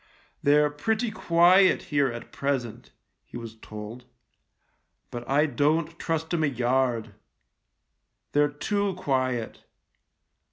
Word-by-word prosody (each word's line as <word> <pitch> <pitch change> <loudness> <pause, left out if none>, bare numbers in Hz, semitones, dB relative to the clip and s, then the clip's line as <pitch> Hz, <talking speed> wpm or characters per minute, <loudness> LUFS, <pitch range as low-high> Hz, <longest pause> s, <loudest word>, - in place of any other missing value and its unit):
" - - -37
They're 150 +1 +4
pretty 220 +10 -1
quiet 180 0 +4
here 145 -1 +3
at 120 0 -9
present," 135 -5 -3 0.3
he - - -10
was 115 -1 -8
told, 110 +3 -9 0.5
" - - -47
but 120 0 -7
I 145 +3 +4
don't 155 +4 0
trust 160 0 -2
'em 165 -2 +1
a - - +3
yard. 120 -3 0 1.2
They're 145 0 +3
too 200 +6 -2
quiet. 130 -8 -2
145 Hz, 120 wpm, -26 LUFS, 120-165 Hz, 1.2 s, They're